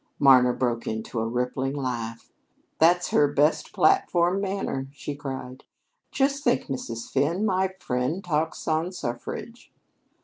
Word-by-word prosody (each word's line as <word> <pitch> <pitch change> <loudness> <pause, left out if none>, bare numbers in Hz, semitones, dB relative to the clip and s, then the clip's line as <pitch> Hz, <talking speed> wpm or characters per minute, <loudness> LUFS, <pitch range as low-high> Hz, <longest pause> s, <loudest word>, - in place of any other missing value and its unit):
Marna 130 -2 +6
broke 120 -2 -1
into 110 +1 -3
a 110 - -1
rippling 125 +3 -2
laugh. 120 -4 -4 0.5
"That's 175 +2 +4
her 145 - +4
best 150 +3 +2
platform 175 +1 +3
manner," 195 -9 -2
she 145 0 -5
cried. 130 -2 -7 0.5
"Just 275 +1 0
think, 245 0 +2
Mrs. 115 -4 -5
Finn, 165 +10 +1
my 190 -1 +1
friend 125 +9 -2
talks 160 -2 -2
on 160 +3 0
suffrage." 175 - -6
145 Hz, 130 wpm, -26 LUFS, 125-180 Hz, 0.5 s, Marna